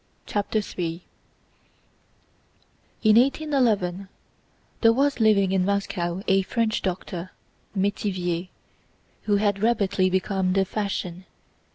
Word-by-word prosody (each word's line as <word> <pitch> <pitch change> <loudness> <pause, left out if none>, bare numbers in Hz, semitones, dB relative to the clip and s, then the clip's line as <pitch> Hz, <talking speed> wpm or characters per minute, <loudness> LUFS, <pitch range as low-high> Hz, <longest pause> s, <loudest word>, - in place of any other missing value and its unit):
CHAPTER 205 +1 -1
III 175 -4 -4 2.0
In 215 0 +6
1811 240 - +1 0.7
there 225 - +6
was 280 +3 +1
living 205 -4 +4
in 190 -1 +2
Moscow 190 -2 -1
a 195 0 +4
French 220 +3 -1
doctor—Métivier—who 185 +1 -4
had 200 -1 +1
rapidly 200 -5 +2
become 190 0 0
the 195 0 +2
fashion. 190 -3 -4
195 Hz, 85 wpm, -25 LUFS, 185-215 Hz, 2.0 s, In